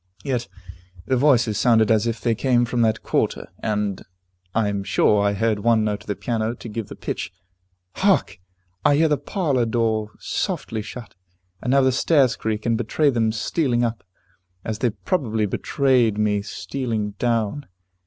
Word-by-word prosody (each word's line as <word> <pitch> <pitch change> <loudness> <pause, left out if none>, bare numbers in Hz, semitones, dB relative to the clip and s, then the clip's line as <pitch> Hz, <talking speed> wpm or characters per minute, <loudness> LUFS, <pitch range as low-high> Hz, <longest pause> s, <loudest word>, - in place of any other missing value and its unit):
Yet 125 -4 -2 0.6
the 130 - +1
voices 120 -5 +3
sounded 115 -2 +4
as 110 +1 +3
if 115 -1 -2
they 115 0 +1
came 120 +1 +2
from 120 0 -1
that 110 -1 +1
quarter - - -1
and 105 -3 -1
and - - -15 0.5
I 110 -2 +2
am 100 -1 -2
sure 105 +1 +3
I 100 0 +2
heard 110 0 0
one 115 +1 +3
note 105 -1 -1
on - - -18
the 105 - -2
piano 115 -1 -2
to 120 - -10
give 110 -1 -5
the - - -9
pitch. - - -4 0.7
Hark! 185 - +2 0.4
I 145 - +5
hear 160 +2 +4
the 150 -3 +1
parlor 145 - 0
door 110 -2 0
softly 110 -1 -3
shut, 115 +3 -9 0.5
and - - -3
now 135 +1 +5
the 130 0 +3
stairs 135 0 +3
creak, 110 -1 -3
and 115 -1 +1
betray 140 +6 +2
them 115 -3 +1
stealing 120 +2 0
up, 115 -2 -2 0.6
as 110 -1 -3
they 120 - +2
probably 110 - -1
betrayed 125 +1 +1
me 105 -1 +1
stealing 110 -1 -3
down. 120 +3 -1
115 Hz, 175 wpm, -22 LUFS, 105-125 Hz, 0.7 s, I